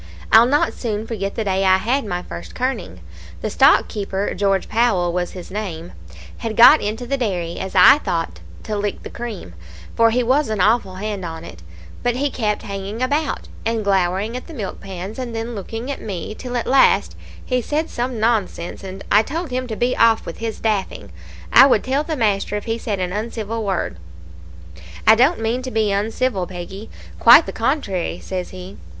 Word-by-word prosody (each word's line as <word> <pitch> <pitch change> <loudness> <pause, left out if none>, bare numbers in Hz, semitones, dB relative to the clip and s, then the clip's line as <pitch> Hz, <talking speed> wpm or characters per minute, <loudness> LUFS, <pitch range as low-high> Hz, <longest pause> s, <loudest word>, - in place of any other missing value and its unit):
I'll 225 +2 +8
not 290 +3 +2
soon 215 -3 -3
forget 200 -4 -4
the 225 - -1
day 195 -1 0
I 190 -1 +5
had 235 +7 0
my 180 -3 -3
first 85 0 -9
kirning. 260 +1 -3 0.4
The - - -2
stockkeeper 200 -2 +2
George 195 -1 0
Powell 200 -7 +1
was 180 0 -2
his 180 0 -9
name 180 -5 -5 0.5
had 225 -1 -4
got 265 +6 +8
into 220 +4 -3
the 275 +3 -1
dairy, 180 -9 -2
as 190 +1 -5
I 190 +10 +8
thought, 165 - -3 0.2
to 215 - -4
lick 205 -1 -3
the - - -8
cream, 220 - -7 0.4
for 230 0 +5
he 245 +2 +1
was 265 +2 +2
an 215 -2 -2
awful 200 -1 +2
hand 205 0 -4
on 165 -1 -6
it; 80 - -11 0.4
but 245 -1 0
he 280 +2 -1
kept 210 -3 -1
hanging 200 +2 -5
about, 290 +4 -1 0.2
and 225 -1 -1
glowering 195 +3 0
at 255 - -7
the 330 - -10
milk 205 -7 -5
pans, 195 +3 -7
and 240 -3 -5
then 225 +1 -4
looking 225 +5 -5
at 275 - -6
me, 195 -1 -5
till 250 +2 -5
at 235 - -2
last 270 +1 +3 0.3
he 250 -1 0
said 305 +6 -1
some 245 -1 -3
nonsense, 210 -7 -1
and 190 0 -8
I 205 - +7
told 315 +5 -5
him 255 0 -2
to 220 - -4
be 245 +3 0
off 230 -1 +3
with - - -7
his 225 -1 -4
daffing; 195 - -2 0.4
I 265 +3 +9
would 235 -6 +3
tell 270 +3 0
the 315 0 -3
master 210 -3 0
if 205 - -4
he 225 0 -2
said 210 -3 -3
an 180 -1 -2
uncivil 220 +1 -4
word. 190 - -2 1.1
"'I 220 - +8
don't 260 +10 +3
mean 230 +3 -1
to 255 - -5
be 220 -4 +1
uncivil, 205 -1 -1
Peggy; 190 +4 -8 0.3
quite 245 +8 +8
the - - -5
contrary,' 220 - -1
says 185 -1 -5
he. 185 +1 -10
215 Hz, 195 wpm, -20 LUFS, 190-245 Hz, 1.1 s, I